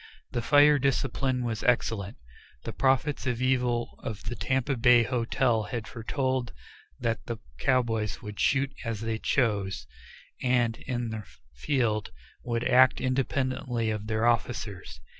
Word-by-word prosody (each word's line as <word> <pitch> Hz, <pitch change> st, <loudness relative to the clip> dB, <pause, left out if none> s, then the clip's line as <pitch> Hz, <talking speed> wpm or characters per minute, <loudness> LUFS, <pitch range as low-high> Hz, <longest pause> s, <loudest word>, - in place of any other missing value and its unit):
The 120 Hz, -, -1 dB
fire 145 Hz, +3 st, +5 dB
discipline 130 Hz, -1 st, 0 dB
was 115 Hz, -2 st, -2 dB
excellent. 110 Hz, -5 st, 0 dB, 0.5 s
The -, -, -5 dB
prophets 135 Hz, +1 st, +1 dB
of 120 Hz, -2 st, -1 dB
evil 125 Hz, -2 st, 0 dB
of 110 Hz, -3 st, -6 dB
the 120 Hz, -, -4 dB
Tampa 130 Hz, +2 st, 0 dB
Bay 120 Hz, 0 st, +5 dB
Hotel 120 Hz, -1 st, +1 dB
had 115 Hz, -3 st, -5 dB
foretold 130 Hz, +2 st, -2 dB, 0.5 s
that 115 Hz, -1 st, -1 dB
the 115 Hz, -, -3 dB, 0.2 s
cowboys 115 Hz, -, +1 dB
would 105 Hz, -2 st, -8 dB
shoot 135 Hz, 0 st, +2 dB
as 115 Hz, -3 st, -3 dB
they 115 Hz, -1 st, -2 dB
chose, 105 Hz, -8 st, 0 dB, 0.6 s
and, 120 Hz, -3 st, +2 dB
in 120 Hz, -3 st, -2 dB
the 110 Hz, -1 st, -5 dB, 0.3 s
field, 110 Hz, -, 0 dB, 0.3 s
would 115 Hz, -1 st, -1 dB
act 130 Hz, 0 st, +5 dB
independently 130 Hz, -3 st, -1 dB
of 105 Hz, 0 st, -4 dB
their 110 Hz, +1 st, 0 dB
officers. 105 Hz, -, -1 dB
120 Hz, 135 wpm, -28 LUFS, 110-130 Hz, 0.6 s, fire